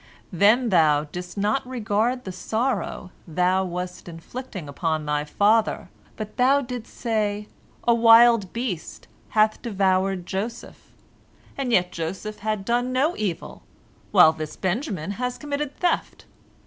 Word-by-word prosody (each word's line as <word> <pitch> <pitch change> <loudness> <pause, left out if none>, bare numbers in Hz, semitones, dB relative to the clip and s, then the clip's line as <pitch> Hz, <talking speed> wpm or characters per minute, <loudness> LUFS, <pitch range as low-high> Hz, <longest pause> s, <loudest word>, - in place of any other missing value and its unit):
Then 215 +7 +4
thou 155 -6 +4
didst 175 +5 -8
not 210 +6 +1
regard 240 0 -1
the 190 - -6
sorrow 220 0 -2 0.2
thou 180 +3 +1
wast 180 0 -5
inflicting 180 - -8
upon 155 +1 -2
thy 150 0 0
father, 210 +8 +2 0.3
but 215 0 -7
thou 265 +3 +4
didst 245 -3 -7
say, 210 -3 -2 0.4
A 235 - +6
wild 230 -3 +6
beast 230 -9 -5 0.2
hath 215 0 +2
devoured 190 -3 0
Joseph. 215 +6 -6 0.6
And 270 -3 -2
yet 180 -5 +3
Joseph 190 +6 -5
had 215 -2 -2
done 245 +2 0
no 280 +7 +1
evil, 195 -6 -4 0.5
while 160 - +7
this 155 -1 -6
Benjamin 195 - -2
has 250 0 -2
committed 290 -1 -4
theft. 355 - -1
210 Hz, 130 wpm, -24 LUFS, 180-240 Hz, 0.6 s, while